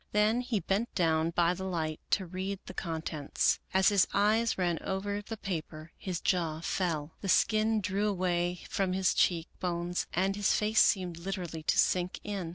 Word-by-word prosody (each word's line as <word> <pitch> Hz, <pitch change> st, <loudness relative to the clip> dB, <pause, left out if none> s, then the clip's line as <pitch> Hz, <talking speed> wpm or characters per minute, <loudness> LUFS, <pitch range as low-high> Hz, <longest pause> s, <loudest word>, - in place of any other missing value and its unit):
Then 215 Hz, +3 st, +3 dB
he 245 Hz, -4 st, -1 dB
bent 200 Hz, +5 st, -1 dB
down 160 Hz, -2 st, +2 dB
by 170 Hz, +1 st, +2 dB
the 190 Hz, +1 st, -6 dB
light 160 Hz, -4 st, -2 dB
to 190 Hz, -, +1 dB
read 190 Hz, +3 st, -4 dB
the -, -, -8 dB
contents. 160 Hz, -4 st, -1 dB
As 190 Hz, +2 st, +4 dB
his 200 Hz, -3 st, +4 dB
eyes 220 Hz, +3 st, +3 dB
ran 175 Hz, -3 st, 0 dB
over 200 Hz, +2 st, -2 dB
the 220 Hz, +2 st, -7 dB
paper, 160 Hz, -4 st, -5 dB
his 180 Hz, -3 st, -4 dB
jaw 165 Hz, -4 st, 0 dB
fell. 165 Hz, -4 st, -1 dB
The 195 Hz, -, -3 dB
skin 215 Hz, +2 st, +3 dB
drew 200 Hz, +2 st, 0 dB
away 180 Hz, -2 st, 0 dB
from 190 Hz, -2 st, -1 dB
his 190 Hz, 0 st, +2 dB
cheek 170 Hz, -2 st, +2 dB
bones 175 Hz, 0 st, -2 dB
and 190 Hz, +2 st, +1 dB
his 205 Hz, 0 st, +2 dB
face 215 Hz, +1 st, +2 dB
seemed 180 Hz, -4 st, +3 dB
literally 175 Hz, -3 st, -4 dB
to 155 Hz, -, +1 dB
sink 180 Hz, 0 st, +2 dB
in. 195 Hz, -5 st, -4 dB
185 Hz, 175 wpm, -30 LUFS, 170-200 Hz, -, As